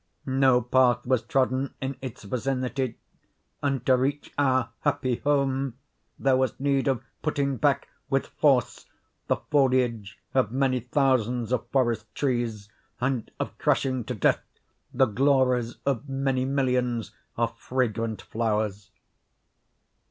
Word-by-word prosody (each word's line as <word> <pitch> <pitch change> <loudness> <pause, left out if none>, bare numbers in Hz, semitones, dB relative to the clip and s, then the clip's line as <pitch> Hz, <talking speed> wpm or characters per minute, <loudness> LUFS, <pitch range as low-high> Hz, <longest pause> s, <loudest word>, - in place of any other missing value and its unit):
No 130 -2 +3
path 125 0 +3
was 130 -2 +2
trodden 135 -2 0
in 135 0 -3
its 130 -4 -7
vicinity; 130 +2 -2 0.6
and, 135 -4 -1
to 130 - +5
reach 140 +3 -1
our 130 -4 +2
happy 125 -2 0
home, 135 -3 0 0.4
there 135 -1 +3
was 130 -2 0
need 140 -1 +1
of 130 -4 0 0.2
putting 140 -3 0
back, - - +2 0.2
with - - +1
force, - - +1 0.4
the - - +3
foliage 125 -7 +1 0.2
of 130 -5 +2
many 130 0 +1
thousands 125 -2 +1
of 125 - 0
forest 120 -5 +1
trees, 120 -6 -1 0.3
and 125 -2 -1
of - - -3
crushing 130 -2 +1
to 125 - -4
death 105 - +2 0.5
the 130 +1 +4
glories 125 0 +2
of 140 0 -1
many 135 -1 0
millions 125 -4 0 0.3
of - - 0
fragrant 115 -3 -1
flowers. 105 -3 -2
130 Hz, 125 wpm, -26 LUFS, 120-135 Hz, 0.6 s, to